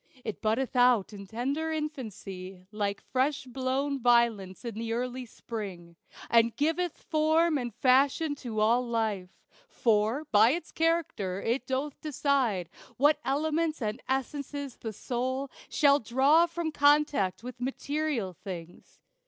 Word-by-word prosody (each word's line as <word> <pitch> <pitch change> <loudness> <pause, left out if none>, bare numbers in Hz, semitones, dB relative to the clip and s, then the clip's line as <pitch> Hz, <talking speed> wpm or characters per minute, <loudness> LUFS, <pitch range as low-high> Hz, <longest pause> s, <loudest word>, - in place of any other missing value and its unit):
It 220 - -5
buddeth 230 +5 0
out 245 -5 +4
in 200 -1 -9
tender 275 +9 -2
infancy, 205 - -6
Like 205 -2 -2
fresh 265 +3 0
blown 265 +2 -1
violets 235 -5 +2
in 235 - -3
the 225 +2 -3
early 250 +1 -3
spring, 190 -8 -7 0.3
And 230 0 +3
giveth 325 +3 -1
form 315 +1 +2
and 240 -2 -4
fashion 275 +6 +3
to 230 -6 -4
all 230 +3 +4
life. 220 -6 -1 0.4
For, 225 +5 +1
by 220 +4 +6
its 340 0 -5
character, 320 - 0
it 240 +4 -1
doth 270 +2 -3
decide 270 - 0 0.3
What 290 +3 +4
elements 310 +4 0
and 215 0 -3
essences 280 0 -3
the 225 - -5
soul 260 +4 -3 0.2
Shall 285 -1 +4
draw 275 +8 +4
from 335 -1 -3
contact 290 -10 +3
with 250 0 -8
material 270 -5 -2
things. 175 -2 -10
255 Hz, 130 wpm, -29 LUFS, 220-290 Hz, 0.4 s, by